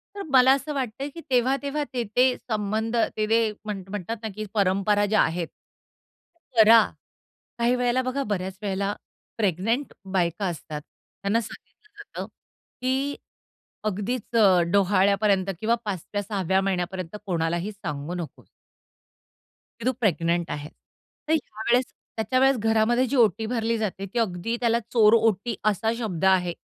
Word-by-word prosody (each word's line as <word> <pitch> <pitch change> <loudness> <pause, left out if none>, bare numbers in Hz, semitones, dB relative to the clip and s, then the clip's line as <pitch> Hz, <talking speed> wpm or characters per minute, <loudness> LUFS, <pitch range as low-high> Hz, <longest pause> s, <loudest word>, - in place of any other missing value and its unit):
तर 400 - -5
मला 260 0 +7
असं 290 +2 -2
वाटतं, 270 0 -3
की 335 - -8
तेव्हा-तेव्हा 275 +4 +1
ते-ते 245 0 +2 0.2
संबंध 215 +1 -1 0.2
ते-ते 215 +1 +3 0.3
म्हण 205 -3 -4
म्हणतात 210 +3 -4
ना, 220 - -2
की 215 0 -4
परंपरा 205 0 +2
ज्या 215 +1 +3
आहेत. 165 +1 0 1.1
करा. 225 +1 +8 0.8
काही 235 +1 +3
वेळेला 250 +1 +1
बघा, 255 +2 -2
बऱ्याच 190 -3 -3
वेळेला 200 0 -1 0.4
प्रेग्नंट 220 - 0 0.2
बायका 180 +1 0
असतात, 155 -3 -5
त्यांना 200 +8 -4
सांगितलं 425 - -13
जातं, 410 - -7 0.6
की 265 +3 0 0.7
अगदीच 215 +4 -2
अ, 195 -5 +6
डोहाळ्यापर्यंत 200 0 +3
किंवा 225 +2 +2
5व्या 205 0 -3
6व्या 190 -2 0
महिन्यापर्यंत 185 -1 -2
कोणालाही 170 +2 -1
सांगू 165 -5 -5
नको. 175 -3 -7 1.3
की 230 - -6
तू 255 - +4
प्रेग्नंट 170 -5 +1
आहेस. 145 0 -5 0.6
तर 315 - +2
ह्यावेळेस, 245 -3 +1 0.3
त्याच्या 225 +3 0
वेळेस 270 0 +4
घरामध्ये 225 +3 +2
जी 280 - -2
ओटी 220 -3 +3
भरली 230 0 0
जाते, 195 -3 -3
ती 205 +5 -3
अगदी 220 +1 -1
त्याला 235 -1 +3
चोरओटी 225 -1 +4
असा 215 +1 +1
शब्द 190 -6 -2
आहे. 180 -2 +3
215 Hz, 135 wpm, -25 LUFS, 190-235 Hz, 1.3 s, करा